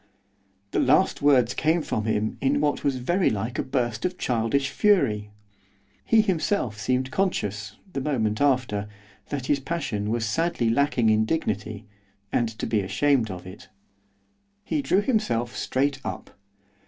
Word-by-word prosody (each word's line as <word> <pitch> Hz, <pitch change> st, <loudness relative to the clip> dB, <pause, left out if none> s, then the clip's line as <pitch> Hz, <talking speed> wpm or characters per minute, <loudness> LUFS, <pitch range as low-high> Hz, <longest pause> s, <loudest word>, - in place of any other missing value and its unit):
The -, -, +1 dB
last -, -, +3 dB
words 130 Hz, -4 st, +4 dB
came 160 Hz, +1 st, +1 dB
from 110 Hz, -6 st, -2 dB
him 110 Hz, 0 st, -1 dB
in 140 Hz, +2 st, +2 dB
what 145 Hz, 0 st, 0 dB
was 140 Hz, -2 st, +1 dB
very 175 Hz, +9 st, +1 dB
like 110 Hz, +4 st, -3 dB
a -, -, +1 dB
burst 120 Hz, -4 st, -2 dB
of 180 Hz, 0 st, -2 dB
childish 125 Hz, +3 st, 0 dB
fury. 110 Hz, -, +2 dB, 0.7 s
He 225 Hz, -1 st, +5 dB
himself 165 Hz, -, -1 dB
seemed 130 Hz, +3 st, 0 dB
conscious, 105 Hz, -, -1 dB, 0.2 s
the 135 Hz, -, -2 dB
moment 110 Hz, -7 st, -1 dB
after, 125 Hz, -7 st, +1 dB, 0.4 s
that 140 Hz, -3 st, -3 dB
his 140 Hz, +1 st, +1 dB
passion 130 Hz, -9 st, -3 dB
was 115 Hz, 0 st, 0 dB
sadly 160 Hz, -2 st, 0 dB
lacking 125 Hz, -3 st, +2 dB
in 110 Hz, 0 st, +3 dB
dignity, 110 Hz, -, -2 dB, 0.5 s
and 120 Hz, -2 st, +1 dB
to -, -, -3 dB
be 110 Hz, -, +1 dB
ashamed 110 Hz, +5 st, +1 dB
of 90 Hz, -2 st, -7 dB
it. 95 Hz, +2 st, -11 dB, 0.9 s
He 295 Hz, -, -1 dB
drew 200 Hz, -7 st, +2 dB
himself 205 Hz, -, 0 dB
straight 135 Hz, +1 st, -1 dB
up. -, -, -6 dB
125 Hz, 150 wpm, -25 LUFS, 110-150 Hz, 0.9 s, He